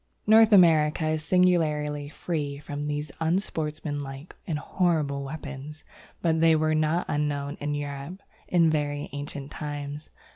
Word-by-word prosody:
North 220 Hz, +1 st, +7 dB
America 160 Hz, -4 st, +5 dB
is 155 Hz, 0 st, -1 dB
singularly 150 Hz, -5 st, +2 dB
free 150 Hz, -3 st, -3 dB
from 145 Hz, 0 st, -6 dB
these 150 Hz, 0 st, -3 dB
unsportsmanlike 155 Hz, -4 st, -3 dB
and 160 Hz, -4 st, -1 dB
horrible 150 Hz, -4 st, 0 dB
weapons, 145 Hz, +1 st, -7 dB, 0.4 s
but 160 Hz, -1 st, +2 dB
they 165 Hz, -1 st, +6 dB
were 155 Hz, 0 st, +2 dB
not 155 Hz, +3 st, +1 dB
unknown 145 Hz, -1 st, -1 dB
in 145 Hz, 0 st, -2 dB
Europe 145 Hz, +5 st, -5 dB, 0.3 s
in 170 Hz, -3 st, +4 dB
very 145 Hz, -1 st, -2 dB
ancient 145 Hz, -1 st, -6 dB
times. 145 Hz, 0 st, -6 dB
150 Hz, 125 wpm, -26 LUFS, 145-160 Hz, 0.4 s, North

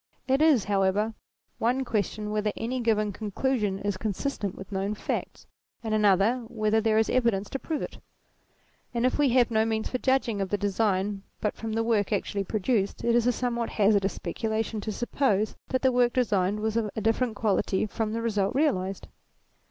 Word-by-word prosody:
It 270 Hz, +2 st, +2 dB
is, 300 Hz, -9 st, +5 dB
however, 200 Hz, +2 st, +1 dB, 0.5 s
one 250 Hz, +3 st, +1 dB
question 210 Hz, -1 st, -2 dB
whether 210 Hz, 0 st, 0 dB
any 250 Hz, +3 st, -2 dB
given 215 Hz, -3 st, +1 dB
conclusion 210 Hz, 0 st, -1 dB
is 200 Hz, -1 st, -2 dB
consistent 205 Hz, 0 st, -3 dB
with 190 Hz, -, -10 dB
known 195 Hz, +2 st, -1 dB
facts, -, -, -4 dB, 0.4 s
and 220 Hz, -1 st, -2 dB
another 210 Hz, +2 st, +4 dB
whether 220 Hz, -1 st, +1 dB
there 220 Hz, 0 st, +2 dB
is 220 Hz, -, +3 dB
evidence 230 Hz, -6 st, +1 dB
to 270 Hz, -, -3 dB
prove 310 Hz, +1 st, -3 dB
it: -, -, -7 dB, 1.0 s
and 235 Hz, +1 st, +1 dB
if 255 Hz, -, +1 dB
we 290 Hz, -2 st, +4 dB
have 245 Hz, -1 st, +3 dB
no 220 Hz, -1 st, +3 dB
means 220 Hz, -1 st, -1 dB
for 255 Hz, -, -1 dB
judging 260 Hz, -6 st, +1 dB
of 195 Hz, -, -2 dB
the 205 Hz, -, 0 dB
design 200 Hz, -1 st, 0 dB, 0.2 s
but 210 Hz, -, -1 dB
from 225 Hz, -1 st, -5 dB
the 225 Hz, +1 st, +1 dB
work 220 Hz, -4 st, +1 dB
actually 200 Hz, -1 st, -1 dB
produced, 210 Hz, 0 st, -1 dB
it 235 Hz, -, +2 dB
is 240 Hz, 0 st, +3 dB
a -, -, +5 dB
somewhat 235 Hz, -1 st, -2 dB
hazardous 200 Hz, -2 st, +2 dB
specu 205 Hz, +6 st, -3 dB
lation 220 Hz, 0 st, -1 dB
to 215 Hz, -, -3 dB
suppose 215 Hz, -2 st, 0 dB
that 260 Hz, -, -1 dB
the 260 Hz, -, +5 dB
work 245 Hz, -1 st, +3 dB
designed 210 Hz, -5 st, +1 dB
was 220 Hz, 0 st, -1 dB
of 225 Hz, -2 st, 0 dB
a 220 Hz, -, -2 dB
different 225 Hz, +1 st, +1 dB
quality 205 Hz, -2 st, +1 dB
from 215 Hz, +1 st, -2 dB
the 230 Hz, +1 st, -2 dB
result 205 Hz, -1 st, 0 dB
realized. 195 Hz, -10 st, 0 dB
220 Hz, 190 wpm, -27 LUFS, 205-235 Hz, 1.0 s, is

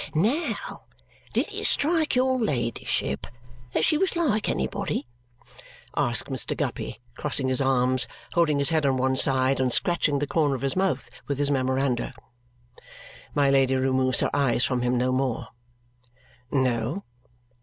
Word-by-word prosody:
"Now, 280 Hz, -, -1 dB, 0.5 s
did -, -, +1 dB
it -, -, -3 dB
strike 315 Hz, 0 st, +2 dB
your 260 Hz, 0 st, +2 dB
ladyship 120 Hz, -, -2 dB, 0.5 s
that 160 Hz, -, +2 dB
she 305 Hz, -, +2 dB
was 385 Hz, -2 st, +1 dB
like 265 Hz, -11 st, +1 dB
anybody?" 190 Hz, -8 st, -2 dB, 0.9 s
asks -, -, +2 dB
Mr. -, -, +1 dB
Guppy, -, -, -4 dB, 0.2 s
crossing 130 Hz, -, 0 dB
his 130 Hz, +1 st, +3 dB
arms, 130 Hz, -1 st, +2 dB, 0.3 s
holding 165 Hz, -4 st, +2 dB
his 140 Hz, +1 st, +2 dB
head 160 Hz, -2 st, +1 dB
on 135 Hz, -2 st, +2 dB
one 130 Hz, +1 st, +1 dB
side, 130 Hz, 0 st, +2 dB
and 130 Hz, -1 st, +1 dB
scratching 155 Hz, -1 st, +2 dB
the 145 Hz, -, -1 dB
corner 145 Hz, -1 st, +1 dB
of 130 Hz, -, -6 dB
his 135 Hz, -, 0 dB
mouth 190 Hz, -1 st, 0 dB, 0.2 s
with 140 Hz, -, -2 dB
his 145 Hz, 0 st, 0 dB
memoranda. 130 Hz, -2 st, 0 dB, 1.2 s
My 140 Hz, -2 st, +3 dB
Lady 135 Hz, -1 st, +3 dB
removes 130 Hz, -1 st, +1 dB
her -, -, 0 dB
eyes 135 Hz, -4 st, +2 dB
from 125 Hz, -2 st, -1 dB
him 125 Hz, 0 st, +1 dB
no 125 Hz, +1 st, +1 dB
more. 130 Hz, -2 st, -1 dB, 1.0 s
"No." 130 Hz, -, 0 dB
135 Hz, 145 wpm, -25 LUFS, 130-170 Hz, 1.2 s, his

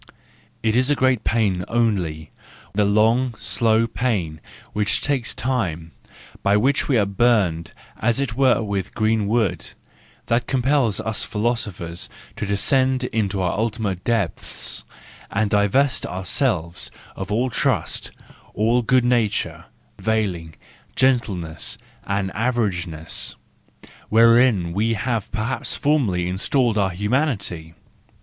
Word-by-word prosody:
It 110 Hz, 0 st, +2 dB
is 130 Hz, +3 st, +3 dB
great 130 Hz, -4 st, +2 dB
pain 100 Hz, -6 st, +1 dB
only, 90 Hz, -10 st, -1 dB, 0.4 s
the 105 Hz, +1 st, +2 dB
long 115 Hz, +4 st, +2 dB
slow 115 Hz, 0 st, +2 dB
pain 105 Hz, -, -2 dB, 0.3 s
which 105 Hz, 0 st, +1 dB
takes 135 Hz, -5 st, -1 dB
time, 90 Hz, -11 st, -2 dB, 0.5 s
by 100 Hz, +1 st, +3 dB
which 135 Hz, +6 st, +2 dB
we 135 Hz, -, +3 dB
are 105 Hz, -, +3 dB
burned 100 Hz, -5 st, +1 dB, 0.3 s
as 120 Hz, +4 st, +1 dB
it 135 Hz, -5 st, -1 dB
were 130 Hz, -3 st, +3 dB
with 100 Hz, -3 st, -3 dB
green 110 Hz, -1 st, +1 dB
wood, 105 Hz, -5 st, 0 dB, 0.6 s
that 120 Hz, 0 st, 0 dB
compels 130 Hz, -4 st, +2 dB
us 110 Hz, -1 st, 0 dB
philosophers 105 Hz, -7 st, -3 dB, 0.3 s
to 105 Hz, -, -4 dB
de¬ 100 Hz, 0 st, 0 dB
scend 130 Hz, +4 st, +2 dB
into 100 Hz, -3 st, 0 dB
our 90 Hz, -, +1 dB
ultimate 105 Hz, -4 st, -2 dB
depths, 115 Hz, -7 st, -1 dB, 0.5 s
and 105 Hz, 0 st, 0 dB
divest 115 Hz, +6 st, +2 dB
ourselves 90 Hz, -, -1 dB, 0.3 s
of 95 Hz, +2 st, -6 dB
all 120 Hz, +4 st, +1 dB
trust, -, -, 0 dB, 0.5 s
all 115 Hz, +3 st, +2 dB
good 125 Hz, +1 st, +3 dB
nature, 120 Hz, -4 st, 0 dB, 0.3 s
veiling, 95 Hz, -8 st, -1 dB, 0.4 s
gentleness, 105 Hz, -11 st, 0 dB, 0.3 s
and 100 Hz, -1 st, -1 dB
averageness, 95 Hz, -9 st, -1 dB, 0.7 s
wherein 115 Hz, -5 st, +4 dB
we 110 Hz, +4 st, +1 dB
have 115 Hz, -2 st, -2 dB
perhaps 110 Hz, +4 st, -2 dB
formerly 115 Hz, -13 st, +1 dB
installed 115 Hz, +6 st, +1 dB
our 100 Hz, -3 st, +2 dB
humanity. 100 Hz, -, -2 dB
110 Hz, 115 wpm, -22 LUFS, 95-120 Hz, 0.7 s, wherein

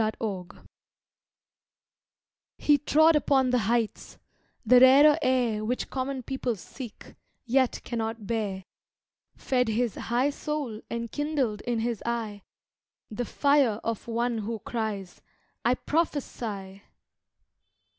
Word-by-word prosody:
The 220 Hz, 0 st, +1 dB
Prophet 190 Hz, -5 st, -6 dB, 1.9 s
HE 295 Hz, -1 st, +4 dB
trod 315 Hz, +2 st, +4 dB
upon 270 Hz, -3 st, +3 dB
the 250 Hz, -, +3 dB
heights; 235 Hz, -2 st, -1 dB, 0.5 s
the 250 Hz, -, +7 dB
rarer 285 Hz, +4 st, +7 dB
air 245 Hz, -6 st, +1 dB
Which 245 Hz, +4 st, -2 dB
common 260 Hz, 0 st, -3 dB
people 255 Hz, -2 st, -2 dB
seek, 230 Hz, +3 st, -10 dB, 0.3 s
yet 260 Hz, +1 st, +2 dB
cannot 225 Hz, -2 st, -4 dB
bear, 200 Hz, -3 st, -2 dB, 0.7 s
Fed 250 Hz, -2 st, 0 dB
his 225 Hz, +1 st, 0 dB
high 250 Hz, +5 st, 0 dB
soul 280 Hz, -7 st, -4 dB
and 235 Hz, -1 st, -4 dB
kindled 285 Hz, -8 st, -1 dB
in 235 Hz, -2 st, 0 dB
his 230 Hz, -2 st, -2 dB
eye 225 Hz, -4 st, -3 dB, 0.7 s
The 240 Hz, +3 st, -3 dB
fire 280 Hz, -5 st, +2 dB
of 230 Hz, -1 st, -3 dB
one 235 Hz, 0 st, -1 dB
who 225 Hz, +2 st, -3 dB
cries 210 Hz, -6 st, -4 dB, 0.4 s
"I 245 Hz, +2 st, +3 dB
prophesy!" 225 Hz, -, -3 dB
235 Hz, 115 wpm, -27 LUFS, 220-265 Hz, 1.9 s, the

